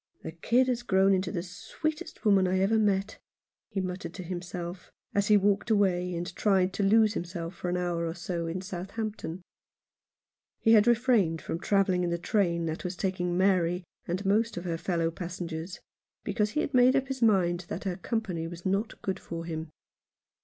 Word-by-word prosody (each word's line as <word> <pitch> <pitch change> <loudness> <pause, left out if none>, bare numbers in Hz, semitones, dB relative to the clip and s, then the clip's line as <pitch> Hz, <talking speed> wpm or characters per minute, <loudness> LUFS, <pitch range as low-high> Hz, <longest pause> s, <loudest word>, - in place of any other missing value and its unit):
" - - -38
The - - -5
kid 235 +10 +2
has 245 -2 0
grown 195 -4 +3
into 185 -1 0
the 170 - -3
sweetest 300 - -5
woman 195 -3 +5
I 185 +1 +1
ever 200 +4 +3
met," 200 -2 +1 0.5
he 195 - -3
muttered 180 -2 -4
to 185 - -6
himself, 175 0 -6 0.2
as 200 0 +1
he 210 -2 +6
walked 200 0 +2
58 220 - +5
Alone 200 - +5
in 185 - +2
London. 180 - -3
away, 175 - -3
and 175 +1 -5
tried 190 -3 +2
to - - -2
lose 215 +2 +5
himself 170 -2 -4
for 175 0 -4
an 180 - 0
hour 175 -2 -1
or 165 - -4
so 170 -1 -3
in 175 +3 -3
Southampton. 190 -1 -5 1.2
He 225 - +3
had 220 0 +6
refrained 230 -9 +3
from 165 - -4
travelling 190 -1 +2
in 175 - 0
the 170 - 0
train 170 -2 +1
that 160 0 -3
was 180 0 -3
taking 180 -2 -1
Mary 180 -2 +2 0.2
and 185 +4 -2
most 220 +3 +2
of 175 - -5
her 165 -2 -2
fellow 165 -2 0
passengers, 170 0 -6 0.4
because 210 -1 0
he 305 - +1
had - - -3
made 255 +1 +6
up 270 -1 +1
his 265 -2 -4
mind 180 -5 +3
that 180 - -4
her 185 -3 -2
company 185 -7 -2
was 170 0 -9
not 195 +4 -1
good 190 0 -2
for 165 0 -6
him. 160 -1 -5
185 Hz, 205 wpm, -29 LUFS, 175-205 Hz, 1.2 s, he